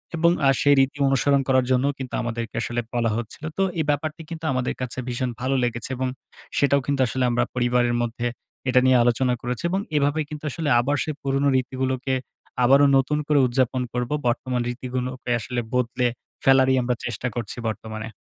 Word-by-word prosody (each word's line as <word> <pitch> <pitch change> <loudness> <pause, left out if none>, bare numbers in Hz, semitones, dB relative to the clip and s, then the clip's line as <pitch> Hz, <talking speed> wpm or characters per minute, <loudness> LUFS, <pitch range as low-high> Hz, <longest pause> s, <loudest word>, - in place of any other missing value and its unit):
এবং 170 +1 +4 0.2
আ - - +6
সেই 145 0 +5
রীতি 135 +1 +2
অনুসরণ 135 +1 +3
করার 130 -1 +3
জন্যও 130 +3 +3
কিন্তু 130 -2 -6
আমাদেরকে 115 0 -4
আসলে 120 0 -2
বলা 115 -2 +1
হচ্ছিল। 120 +6 -6
তো 195 - +3 0.2
এই 155 - +1
ব্যাপারটি 155 +2 -1
কিন্তু 165 -1 -6
আমাদের 130 -1 -1
কাছে 125 0 -4
ভীষণ 125 0 -2
ভালো 135 +1 0
লেগেছে। 120 0 -2
এবং 130 0 -1 0.5
সেটাও 140 0 +3
কিন্তু 140 -2 0
আসলে 125 +2 -1
আমরা 120 0 +2
পরিবারের 120 -1 +2
মধ্যে 120 +1 -2 0.4
এটা 125 0 +5
নিয়ে 130 -1 +6
আলোচনা 125 +1 +2
করেছি। 125 -1 -3
এবং 190 +2 0 0.2
এভাবে 145 +2 +1
কিন্তু 150 0 -8
আসলে 155 +2 -2
আবার 140 +4 +1
সেই 155 - -4
পুরোনো 135 +1 +1
রীতিগুলোকে 130 0 -2 0.5
আবারো 140 +3 +6
নতুন 135 +3 +1
করে 150 -1 +4
উদযাপন 130 0 +1
করব। 125 -1 -2 0.2
বর্তমান 125 +1 0
রীতিগুলোকে 125 0 -4
আসলে 120 +2 -3
বদলে 125 0 +1 0.4
ফেলারই 130 0 +5
আমরা 125 0 0
চেষ্টা 120 +2 -3
করছি 115 -2 -4
বর্তমানে। 110 +1 -5
130 Hz, 180 wpm, -24 LUFS, 120-140 Hz, 0.5 s, আ